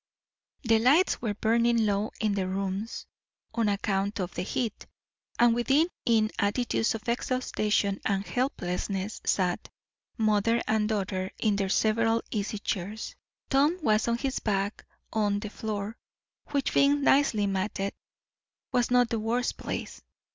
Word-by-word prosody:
The 225 -2 +4
lights 285 +11 +4
were 215 -4 -1
burning 230 +1 +2
low 205 +1 0
in 215 -2 +1
the 195 -2 -1
rooms, 195 +3 -3 0.5
on 230 -3 +1
account 200 0 -1
of 180 -1 -3
the - - -3
heat; 225 +4 -3 0.5
and 240 -1 +5
within, 275 +8 +3 0.2
in 220 -2 +3
attitudes 225 +2 +1
of 220 0 -8
exhaustion 215 -5 0
and 200 -1 0
helplessness 195 -5 -2
sat 180 -2 0 0.5
mother 220 +1 +2
and 215 -1 +1
daughter 190 -3 -1
in 210 -2 +1
their 195 -1 -1
several 225 +2 +2
easy 210 0 -2
chairs. 205 +1 -4 0.4
Tom 290 +6 +3
was 215 -3 +2
on 235 0 +1
his 265 +1 -2
back 200 -1 -2 0.3
on 205 -2 +1
the 210 0 -5
floor, 215 0 -4 0.5
which, 280 -2 -1
being 280 +1 +4
nicely 270 -8 +4
matted, 195 0 -2 0.8
was 245 -1 +2
not 245 -1 +4
the 230 - 0
worst 235 +3 0
place. - - -5
215 Hz, 140 wpm, -28 LUFS, 200-235 Hz, 0.8 s, and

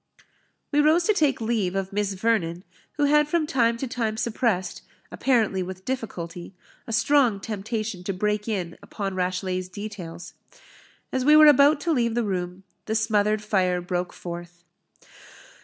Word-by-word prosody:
We 290 - +2
rose 315 +4 +4
to 425 - +3
take 300 -8 +2
leave 220 -5 -1
of 195 0 -3
Miss 205 -1 -1
Vernon, 185 -4 0 0.3
who 290 - -1
had 300 +1 +4
from 320 0 +1
time 235 -7 +1
to 265 - -4
time 225 -3 -2
suppressed, 215 -5 -1 0.3
apparently 220 -7 +1
with 185 +1 -7
difficulty, 180 -8 -5 0.3
a - - -5
strong 230 -1 +3
temptation 215 -1 -4
to 195 - -1
break 210 +3 -1
in 185 -6 -3
upon 195 -2 -5
Rashleigh's 185 0 -2
details. 185 -4 -8 0.8
As 260 - -1
we 300 +3 +6
were 305 0 +9
about 290 +1 +6
to 335 +1 +1
leave 235 -4 +1
the 240 - +1
room, 180 -2 -3 0.2
the 220 - -1
smothered 215 -1 +1
fire 185 -4 +1
broke 180 0 -3
forth. 175 0 -9
210 Hz, 155 wpm, -25 LUFS, 185-245 Hz, 0.8 s, were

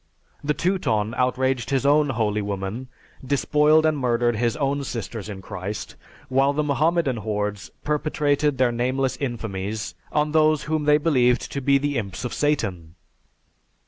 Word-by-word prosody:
The 150 +1 0
Teuton 115 - 0
outraged 130 -1 0
his 135 -1 0
own 145 +1 +4
'holy 110 -4 0
women,' 100 +5 -4 0.4
despoiled 150 +3 +3
and 155 -1 +3
murdered 120 -2 +1
his 115 +4 0
own 140 -1 0
'sisters 115 -4 -5
in 95 -2 -7
Christ,' 95 +5 -6 0.3
while 135 +2 +2
the 150 +1 0
Mohammedan 150 -1 +1
hordes 105 -1 -3
perpetrated 150 -1 0
their 125 -2 +3
nameless 130 +2 0
infamies 110 -5 -4 0.2
on 150 0 +1
those 155 -1 +3
whom 155 -1 -1
they 150 0 +5
believed 125 -6 +2
to 140 - -3
be 140 +1 +4
the 145 -2 -1
imps 100 +2 -6
of 125 - -4
Satan. 95 - -1
130 Hz, 145 wpm, -23 LUFS, 110-150 Hz, 0.4 s, they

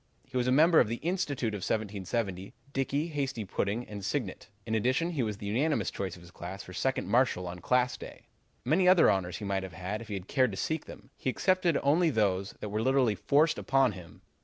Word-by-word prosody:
He 130 - -15
was 125 -1 +1
a - - +3
member 160 +5 +6
of 120 - +4
the 115 - -2
Institute 145 - -2
of 105 - -3
1770, 100 -1 -3 0.2
Dickey, 140 +4 -1
Hasty 135 -7 -3
Pudding, 100 +5 -2
and 100 -2 -7
Signet. 105 -1 -3 0.2
In 110 - -3
addition, 130 +10 +1
he 150 -6 -1
was 105 -3 -2
the 100 - -8
unanimous 135 +10 0
choice 95 -3 -4
of 90 - -14
his 85 - -14
class 90 +2 -7
for 90 - -11
Second 130 -1 -1
Marshal 115 -4 +2
on 90 0 -6
Class 125 +6 +1
Day. - - -11 0.4
Many 180 +4 +3
other 180 - +7
honors 90 -3 -1
he 105 - -6
might 100 -1 0
have 95 -3 -7
had 95 +5 -4
if 115 - -9
he 105 - -4
had 95 -1 -6
cared 130 -3 +3
to - - -6
seek 160 +7 -2
them. - - -12
He - - -2
accepted 185 +2 +2
only 160 +5 +4
those 100 -6 0
that 105 - -4
were 105 +2 -1
literally 130 -2 +3
forced 150 - +2
upon 135 -1 +3
him. 90 -3 -12
115 Hz, 225 wpm, -30 LUFS, 100-140 Hz, 0.4 s, other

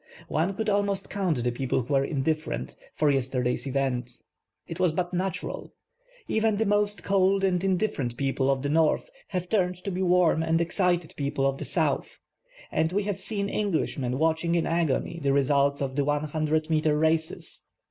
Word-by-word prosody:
One 175 +5 0
could 220 +2 -2
almost 200 -1 0
count 180 -11 0
the 125 - +1
people 125 +1 -1
who 140 - -4
were 135 0 +4
indifferent, 150 - -2 0.2
for 150 -2 +3
yesterday's 130 -1 -1
events. 125 -2 -2 0.4
It - - -7
was 175 -4 +3
but 180 +2 -2
natural. 185 0 -3 0.5
F.ven 220 -1 +1
the 225 - +1
most 205 0 +1
cold 195 0 +2
and 180 -2 +1
indifferent 185 - 0
people 135 -1 0
of 135 -1 +1
the 145 - -1
north 160 - +2 0.2
have 180 -1 -3
turned 180 -3 +1
to 200 - -3
he 185 - -2
warm 180 -3 +3
and 165 0 +1
excited 175 -1 0
people 140 -1 -1
of 135 0 0
the - - -3
south, - - -1 0.5
and 160 +1 +1
we 200 +2 0
have 200 -1 -2
seen 200 0 -2
Englishmen* 155 -11 -1
watching 160 +2 +1
in 170 - +1
agony 165 0 0
the 140 -1 +2
results 140 0 +2
of 130 -1 -3
the 145 - +2
100 155 +2 0
meter 155 -1 +2
races. 160 +1 -1
160 Hz, 175 wpm, -27 LUFS, 140-185 Hz, 0.5 s, were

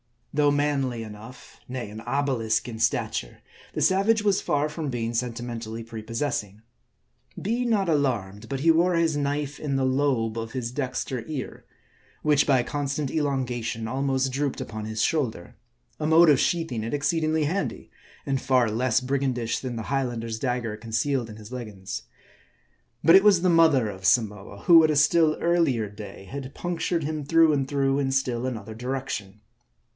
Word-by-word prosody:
Though 145 0 +3
manly 140 -5 0
enough, 110 +4 -12
nay, 125 -4 -5
an 110 +1 -8
obelisk 120 -3 0
in 115 -2 -6
stature, - - -1 0.3
the - - -3
savage 205 +3 +3
was 200 -2 +2
far 145 +1 +1
from 150 -1 -4
being 120 -2 -2
sentimentally 115 -1 -4
prepossessing. 115 -2 -4 0.8
Be 235 +5 -1
not 210 -5 +1
alarmed; 115 -10 -1
but 135 -1 -3
he 165 +2 +5
wore 175 +2 +3
his 165 -2 +2
knife 145 0 -2
in 145 -3 -2
the 135 -1 +1
lobe 130 -4 +1
of 115 0 -6
his 120 -3 -3
dexter 130 -2 -3
ear, 150 -5 -6 0.6
which, 150 -2 +3
by 130 -4 +4
constant 140 +1 -2
elongation 125 -6 -2
almost 135 +1 0
drooped 140 +1 -2
upon 110 -1 -5
his 110 0 -2
shoulder. 125 - -1 0.4
A 150 - -1
mode 160 +1 +6
of 140 -4 +5
sheathing 165 -10 0
it 115 - -4
exceedingly 155 +2 +1
handy, 150 - -3 0.3
and 135 -1 -1
far 130 -4 +2
less 125 +2 +1
brig 135 +2 -1
andish 125 -4 -1
than 125 -2 -4
the 115 - -4
Highlander's 120 -4 -2
dagger 120 -4 -2
concealed 115 +2 -1
in 105 - -9
his 110 +1 -12
leggins. 105 -7 -6 1.0
But 165 - +7
it 195 - +4
was 200 -4 +5
the 185 - +3
mother 160 -9 +4
of 95 -2 -8
Samoa, 105 -4 +1
who 165 -2 +7
at 155 - +4
a 155 - +2
still 155 +2 +4
earlier 155 -11 +2
day 105 -1 -10
had 135 +5 -8
punctured 175 -1 -2
him 155 0 -3
through 165 +2 +4
and 135 -2 0
through 135 0 +1
in 135 -1 0
still 130 -2 0
another 110 -4 -5
direction. 120 -4 -5
130 Hz, 165 wpm, -25 LUFS, 115-150 Hz, 1.0 s, But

